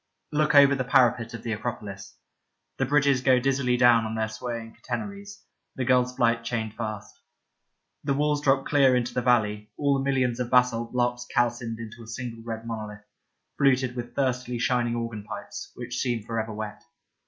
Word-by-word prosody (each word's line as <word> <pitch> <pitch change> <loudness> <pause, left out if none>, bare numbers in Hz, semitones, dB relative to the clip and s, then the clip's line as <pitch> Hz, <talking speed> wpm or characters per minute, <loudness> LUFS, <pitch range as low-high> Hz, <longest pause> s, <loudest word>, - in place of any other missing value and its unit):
Look 150 0 +2
over 140 0 +8
the 135 -2 0
parapet 125 -3 +3
of 115 - -9
the 115 - -3
Acropolis. 105 -3 -6 0.6
The 135 - 0
bridges 140 -2 +3
go 130 -1 +4
dizzily 130 -1 +1
down 120 -2 +5
on 110 0 -4
their 110 -1 -1
swaying 115 0 -6
catenaries, 200 -1 -6 0.3
the 130 - -2
gull's 125 0 +2
flight 115 -1 +2
chained 115 -2 -3
fast. 110 -3 -6 0.8
The 140 -1 0
walls 150 0 +1
drop 135 -1 +2
clear 135 -3 +4
into 125 -1 -1
the 125 - 0
valley, 105 -4 +1
all 145 -1 +2
the - - -2
millions 130 -3 +1
of 125 -1 -2
basalt 125 -2 +2
blocks 120 0 0
calcined 120 -2 0
into 115 +1 -9
a 115 - -11
single 115 0 -6
red 115 -1 -6
monolith, 105 -2 -6 0.5
fluted 130 -2 +3
with 120 -1 -6
thirstily 125 -2 -1
shining 120 0 +1
organ 115 -3 -4
pipes, - - -8
which 125 0 -6
seem 120 -4 -1
for 115 +1 -3
ever 110 0 -3
wet. 105 0 -6
120 Hz, 175 wpm, -26 LUFS, 115-130 Hz, 0.8 s, over